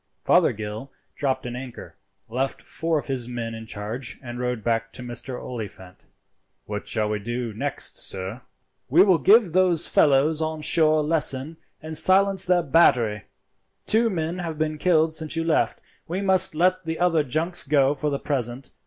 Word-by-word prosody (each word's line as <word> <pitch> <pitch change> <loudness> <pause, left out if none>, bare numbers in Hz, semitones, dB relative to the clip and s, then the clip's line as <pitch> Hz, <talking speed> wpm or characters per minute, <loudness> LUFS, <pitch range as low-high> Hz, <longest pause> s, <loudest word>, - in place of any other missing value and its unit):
Fothergill 110 +5 +1 0.2
dropped 130 -2 -2
an 120 0 -5
anchor, 125 -4 -9 0.3
left 130 +4 -3
four 165 0 -2
of 145 - -4
his 130 -4 -3
men 120 -2 -5
in 115 0 -9
charge, 110 +3 -4
and 120 -1 -7
rowed 125 -3 -3
back 115 -1 -1
to 125 - -6
Mr. 125 +1 -6
Oliphant. 100 -6 -9 0.6
"What 105 0 -6
shall 110 -2 -1
we 105 0 -2
do 120 +1 -4
next, 105 - -3
sir?" 95 +5 -2 0.5
"We 165 +8 +6
will 185 -5 +3
give 205 -2 +5
those 180 -3 +4
fellows 150 +2 +3
on 155 0 -3
shore 155 0 +3
a - - -2
lesson, 150 -1 0 0.3
and 160 0 -5
silence 190 +3 +4
their 180 -1 +3
battery. 120 -9 +3 0.6
Two 230 +1 +3
men 170 -2 -3
have 165 -3 -5
been 155 0 -2
killed 160 -2 +2
since 160 0 -2
you 165 - -1
left. 165 -1 0 0.3
We 185 +4 -3
must 190 -3 +3
let 185 +2 +1
the 160 0 -3
other 175 -2 +2
junks 160 +6 -1
go 140 -1 +2
for 150 +1 -2
the 140 - -1
present. 130 -2 -4
145 Hz, 170 wpm, -24 LUFS, 120-165 Hz, 0.6 s, We